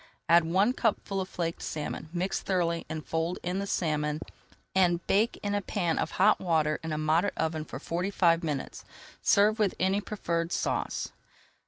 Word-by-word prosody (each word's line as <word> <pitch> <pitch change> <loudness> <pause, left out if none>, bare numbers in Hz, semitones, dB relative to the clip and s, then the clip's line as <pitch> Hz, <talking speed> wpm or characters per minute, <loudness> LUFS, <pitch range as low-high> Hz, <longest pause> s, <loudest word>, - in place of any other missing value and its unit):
Add 170 -1 +6
one 195 +8 +3
cupful 205 -5 0
of 185 - -5
flaked 165 -1 -3
salmon, 155 0 -4
mix 180 +2 -1
thoroughly, 170 -3 0
and 155 -1 -5
fold 165 +2 -1
in 180 +2 -1
the 200 - -3
salmon, 150 -4 0 0.5
and 175 -2 +3
bake 215 +4 +2
in 205 0 -1
a 205 - +1
pan 175 -4 -1
of - - 0
hot 210 +3 +4
water 155 -4 +1
in 160 -1 -5
a 155 - -1
moderate 160 +5 +1
oven 160 -1 -1
for - - -7
forty 170 +6 -2
five 170 -3 +3
minutes. 150 -4 -3 0.4
Serve 210 +2 +4
with 205 -3 +2
any 190 +2 +2
preferred 170 -5 -2
sauce. - - -1
175 Hz, 175 wpm, -29 LUFS, 160-195 Hz, 0.5 s, Add